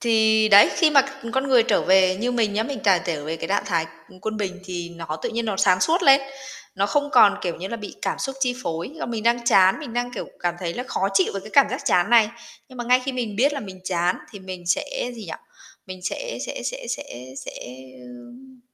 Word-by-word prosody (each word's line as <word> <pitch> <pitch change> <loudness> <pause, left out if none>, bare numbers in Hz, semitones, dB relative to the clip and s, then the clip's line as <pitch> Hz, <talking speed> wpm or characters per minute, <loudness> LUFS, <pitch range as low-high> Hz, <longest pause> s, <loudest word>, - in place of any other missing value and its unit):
Thì 220 -1 +3
đấy, 200 0 +8
khi 325 -3 +4
mà 275 -3 +6
c - - -7 0.3
con 265 +1 0
người 250 -3 +5
trở 235 - +1
về, 185 0 +4
như 245 +4 -1
mình 220 -4 +1
nhá, 215 - 0
mình 270 +4 -5
càng 190 -3 +4
trở 150 -4 -3
về 160 +1 -4
cái 165 - -6
trạng 200 +1 +1
thái, 165 -4 0 0.2
ừm, 185 - -17
quân 220 +1 -4
bình 190 -2 -4
thì 175 -2 -5
nó 160 -2 -5
tự - - -1
nhiên 235 +1 -2
nó 215 -3 -2
sáng 185 -1 +3
suốt 340 +3 +2
lên, 275 -1 +7 0.5
nó 195 +1 0
không 290 +6 0
còn, 200 - +6
kiểu 175 -2 -2
như 185 +2 -6
là, 230 - -4
bị 210 -3 -8
cảm - - -2
xúc 270 -1 -4
chi 250 -2 +1
phối, 165 +3 -4
là 320 - -5
mình 230 -2 -4
đang 235 +1 +1
chán, 190 -4 +5
mình 260 -7 -8
đang, 245 0 -2
kiểu, - - -6
cảm 175 -1 -1
thấy 170 -2 -4
là 245 - -4
khó 195 -6 -2
chịu 190 -2 +2
với 195 - -4
cái 215 +3 -12
cảm 280 - +6
giác - - -3
chán 200 -5 +2
này. 230 -3 +6 0.4
Nhưng 255 -1 -13
mà 240 - -3
ngay 250 +1 +4
khi 270 - -2
mình 230 -5 -4
biết 280 +5 +3
là 285 - -4
mình 190 -3 -10
chán 180 -1 0
thì 205 - -10
mình 185 -2 -9
sẽ 375 - -1
gì 225 -3 -9
nhỉ? - - -7 0.5
Mình 185 -1 -9
sẽ - - -4
sẽ - - -6
sẽ - - -5
sẽ 125 - -6
sẽ, - - -7 0.5
ưm, 240 - -14
215 Hz, 255 wpm, -23 LUFS, 185-250 Hz, 0.5 s, đấy